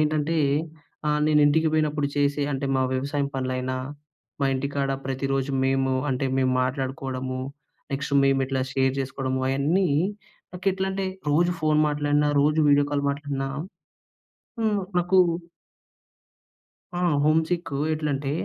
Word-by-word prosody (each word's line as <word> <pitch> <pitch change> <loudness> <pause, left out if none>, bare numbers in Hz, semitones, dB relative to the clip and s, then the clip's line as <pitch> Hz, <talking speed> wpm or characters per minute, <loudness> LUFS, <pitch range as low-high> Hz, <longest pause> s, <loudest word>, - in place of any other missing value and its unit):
ఏంటంటే, 155 +1 +1 0.7
ఆహ్, 150 0 +1
నేను 150 -1 +4
ఇంటికి 160 +2 +3
పోయినప్పుడు 150 -2 +1
చేసే 145 0 +1
అంటే 135 +1 -2
మా 130 - +2
వ్యవసాయం 140 +2 -1
పనులైనా, 130 0 -2 0.6
మా 140 - +3
ఇంటికాడ 140 +1 -1 0.2
ప్రతిరోజు 135 +1 -1
మేము 135 0 +1 0.2
అంటే, 135 +1 0
మేము 130 -1 +2
మాట్లాడుకోడము. 130 -1 -3 0.5
నెక్స్ట్ 140 +1 -2
మేము 135 0 +3
ఇట్లా 130 -1 -1
షేర్ 130 -1 +2
చేసుకోడము, 130 0 -2
అయన్నీ 155 +8 +2 0.7
నాకేట్లంటే 190 +1 -1 0.2
రోజు 175 +4 +3
ఫోన్ 155 -1 +2
మాట్లాడిన, 145 0 +1
రోజు 150 +2 +2
వీడియో 145 0 +4
కాల్ 140 0 0
మాట్లాడినా 140 -1 -3 1.1
హ్మ్. 215 -2 +1 0.2
నాకు 180 +2 +2 1.8
ఆ! - - -1 0.2
హోమ్‌సిక్ 160 +2 +1 0.2
ఎట్లంటే, 145 -2 -2
140 Hz, 115 wpm, -25 LUFS, 135-155 Hz, 1.8 s, నేను